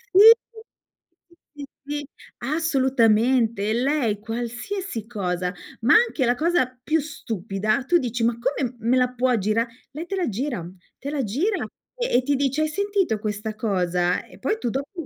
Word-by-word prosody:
Sì, 425 Hz, +4 st, +11 dB, 1.2 s
sì, 290 Hz, -2 st, -8 dB, 0.2 s
sì 290 Hz, 0 st, -4 dB, 0.3 s
assolutamente, 245 Hz, -6 st, +2 dB
lei 245 Hz, -4 st, +1 dB
qualsiasi 240 Hz, -, -4 dB
cosa, 180 Hz, -5 st, -2 dB, 0.3 s
ma 240 Hz, -, +5 dB
anche 440 Hz, -, +3 dB
la 240 Hz, +1 st, +2 dB
cosa 330 Hz, -1 st, +2 dB, 0.2 s
più 320 Hz, +3 st, +2 dB
stupida, 215 Hz, -, -2 dB
tu 345 Hz, +5 st, +4 dB
dici: 245 Hz, -5 st, -2 dB
"Ma 230 Hz, 0 st, +2 dB
come 255 Hz, 0 st, -1 dB
me 235 Hz, +4 st, +2 dB
la 250 Hz, 0 st, +3 dB
puoi 250 Hz, -1 st, +2 dB
gira", 215 Hz, +4 st, +1 dB, 0.3 s
lei 310 Hz, +4 st, -6 dB
te 390 Hz, -, -3 dB
la 370 Hz, -3 st, 0 dB
gira 240 Hz, +2 st, -2 dB
uhm, 175 Hz, +3 st, -10 dB, 0.2 s
te 280 Hz, -, -5 dB
la 285 Hz, -3 st, -1 dB
gira, 320 Hz, -, 0 dB, 0.3 s
e -, -, -1 dB
e 250 Hz, -, +1 dB
ti 285 Hz, +2 st, +1 dB
dice: 275 Hz, +2 st, 0 dB
"Hai 310 Hz, -, +2 dB
sentito 395 Hz, -, 0 dB
questa 215 Hz, 0 st, -4 dB
cosa?", 180 Hz, -4 st, 0 dB
E -, -, -16 dB
poi 430 Hz, -, 0 dB
tu 240 Hz, -, -1 dB
dopo 285 Hz, -, -4 dB
250 Hz, 165 wpm, -24 LUFS, 220-300 Hz, 1.2 s, Sì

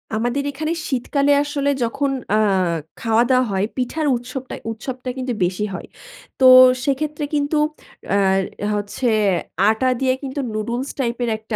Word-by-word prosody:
আমাদের 240 Hz, +5 st, -1 dB
এখানে 310 Hz, +3 st, -2 dB, 0.2 s
শীতকালে 280 Hz, +2 st, +1 dB
আসলে 290 Hz, -1 st, -1 dB
যখন 275 Hz, +4 st, -1 dB, 0.2 s
আ -, -, +4 dB, 0.6 s
খাওয়া-দাওয়া 240 Hz, +3 st, +3 dB
হয় 195 Hz, +1 st, +1 dB
পিঠার 295 Hz, +5 st, -1 dB
উৎসবটায় 250 Hz, +2 st, -7 dB
উৎসবটা 250 Hz, +3 st, -6 dB
কিন্তু 255 Hz, -1 st, -2 dB
বেশি 185 Hz, +4 st, -1 dB
হয়। -, -, -7 dB, 0.5 s
তো 260 Hz, -, +4 dB, 0.4 s
সেক্ষেত্রে 295 Hz, +2 st, -1 dB
কিন্তু 290 Hz, +1 st, 0 dB, 0.6 s
আর 195 Hz, -1 st, +3 dB, 0.4 s
হচ্ছে 205 Hz, +5 st, -2 dB, 0.6 s
আটা 220 Hz, +4 st, +1 dB
দিয়ে 260 Hz, -1 st, +2 dB
কিন্তু 270 Hz, +1 st, -4 dB
নুডলস 235 Hz, +5 st, -3 dB
টাইপের 240 Hz, -1 st, -1 dB
একটা 220 Hz, 0 st, -6 dB
255 Hz, 130 wpm, -20 LUFS, 225-280 Hz, 0.6 s, আ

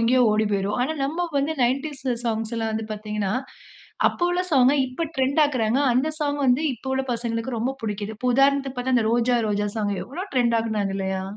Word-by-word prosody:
எங்கயோ 250 Hz, +2 st, +4 dB
ஓடி 215 Hz, +1 st, +2 dB
போயிரும். 200 Hz, +2 st, 0 dB
ஆனா, 305 Hz, +5 st, 0 dB
நம்ம 340 Hz, +5 st, -2 dB
வந்து 285 Hz, +3 st, 0 dB
90ஸ் 270 Hz, +1 st, -1 dB
சாங்ஸ்லாம் 225 Hz, 0 st, -2 dB
வந்து 220 Hz, 0 st, -2 dB
பார்த்தீங்கன்னா, 210 Hz, -1 st, -3 dB, 0.8 s
அப்ப -, -, -9 dB
உள்ள 355 Hz, -, +1 dB
சாங்க, 260 Hz, -1 st, +5 dB
இப்ப 255 Hz, +6 st, -3 dB
ட்ரெண்ட் 265 Hz, +3 st, +2 dB
ஆக்குறாங்க. 250 Hz, -4 st, +1 dB, 0.2 s
அந்த 265 Hz, +5 st, +2 dB
சாங் 290 Hz, -1 st, 0 dB
வந்து 255 Hz, +5 st, +3 dB
இப்போ 265 Hz, -, -9 dB
உள்ள 265 Hz, -, 0 dB
பசங்களுக்கு 230 Hz, +1 st, -3 dB
ரொம்ப 245 Hz, +4 st, 0 dB
புடிக்கிது. 210 Hz, 0 st, -3 dB
இப்போ 250 Hz, 0 st, 0 dB
உதாரணத்துக்கு 275 Hz, -1 st, +3 dB
பார்த்தா, 255 Hz, +1 st, 0 dB
அந்த 225 Hz, -2 st, +2 dB
ரோஜா, 240 Hz, +1 st, +2 dB
ரோஜா 205 Hz, 0 st, 0 dB
சாங் 205 Hz, -2 st, 0 dB
எவ்ளோ 335 Hz, +10 st, -6 dB
ட்ரெண்ட் 235 Hz, -2 st, +3 dB
ஆக்குனாங்க. 210 Hz, -3 st, -1 dB
இல்லயா! 190 Hz, 0 st, -2 dB
240 Hz, 185 wpm, -24 LUFS, 220-270 Hz, 0.8 s, சாங்க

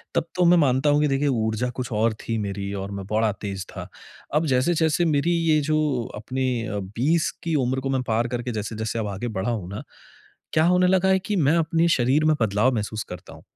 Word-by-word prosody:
तब -, -, +1 dB
तो 180 Hz, -1 st, +3 dB
मैं 175 Hz, +1 st, +6 dB
मानता 135 Hz, -1 st, +3 dB
हूँ 145 Hz, 0 st, +3 dB
कि 150 Hz, -, +3 dB
देखिए 135 Hz, +1 st, 0 dB
ऊर्जा 110 Hz, -1 st, 0 dB
कुछ 125 Hz, -, -6 dB
और 110 Hz, +1 st, +2 dB
थी 115 Hz, -, -1 dB
मेरी 100 Hz, -1 st, -4 dB
और 100 Hz, -, -6 dB
मैं 100 Hz, -1 st, -6 dB
बड़ा 110 Hz, 0 st, +2 dB
तेज़ 95 Hz, -3 st, -4 dB
था। -, -, -6 dB, 0.5 s
अब 155 Hz, +2 st, +2 dB
जैसे-जैसे 160 Hz, +5 st, +2 dB
मेरी 155 Hz, +1 st, +1 dB, 0.2 s
ये 155 Hz, -1 st, +4 dB
जो 155 Hz, -, +3 dB, 0.4 s
अपने 130 Hz, +5 st, -3 dB, 0.2 s
अ, 105 Hz, -, -3 dB
20 125 Hz, -, 0 dB
की 165 Hz, -2 st, -1 dB
उम्र 130 Hz, +2 st, 0 dB
को 135 Hz, -, -3 dB
मैं 130 Hz, -1 st, 0 dB
पार 115 Hz, +2 st, +1 dB
करके 120 Hz, 0 st, -3 dB
जैसे-जैसे 110 Hz, +1 st, -3 dB
अब 110 Hz, -, -2 dB
आगे 100 Hz, +4 st, -4 dB
बड़ा 100 Hz, +5 st, -1 dB
हूँ 100 Hz, -6 st, -4 dB
ना। 100 Hz, -, -6 dB, 0.7 s
क्या 155 Hz, -, +4 dB
होने 180 Hz, +1 st, +4 dB
लगा 190 Hz, +1 st, +3 dB
है 190 Hz, 0 st, +4 dB
कि 205 Hz, +3 st, -3 dB
मैं 150 Hz, -1 st, +3 dB
अपने 165 Hz, +1 st, +2 dB
शरीर 135 Hz, 0 st, +2 dB
में 155 Hz, 0 st, +4 dB
बदलाव 110 Hz, +4 st, +2 dB
महसूस 110 Hz, 0 st, -3 dB
करता 90 Hz, -, -9 dB
हूँ। -, -, -14 dB
125 Hz, 220 wpm, -24 LUFS, 110-155 Hz, 0.7 s, मैं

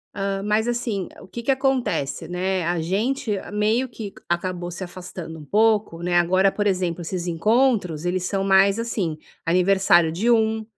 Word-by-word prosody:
Hã, 195 Hz, 0 st, -2 dB
mas, 215 Hz, +2 st, +1 dB
assim, 230 Hz, -6 st, -2 dB
o -, -, -13 dB
que 235 Hz, +5 st, -7 dB
que 240 Hz, -, -6 dB
acontece, 265 Hz, -, 0 dB
né, 185 Hz, +1 st, -1 dB
a 175 Hz, 0 st, 0 dB
gente 220 Hz, -, -1 dB, 0.2 s
meio 215 Hz, +5 st, +1 dB
que 220 Hz, -4 st, -7 dB
c -, -, -24 dB, 0.2 s
acabou 175 Hz, 0 st, -2 dB
se 175 Hz, +2 st, -6 dB
afastando 175 Hz, -2 st, -8 dB
um 150 Hz, -, -10 dB
pouco, 210 Hz, -2 st, +2 dB
né. 180 Hz, 0 st, 0 dB
Agora, 185 Hz, +3 st, +3 dB
por 205 Hz, +1 st, -1 dB
exemplo, 180 Hz, -3 st, -1 dB
esses 175 Hz, +1 st, -4 dB
encontros, 180 Hz, -, +1 dB
eles 180 Hz, 0 st, -1 dB
são 195 Hz, 0 st, -1 dB
mais, 195 Hz, +1 st, +4 dB
assim, 200 Hz, -9 st, -2 dB, 0.3 s
aniversário 180 Hz, -1 st, +4 dB
de 210 Hz, +9 st, 0 dB
um, 220 Hz, -1 st, +2 dB
195 Hz, 175 wpm, -23 LUFS, 175-220 Hz, 0.3 s, mais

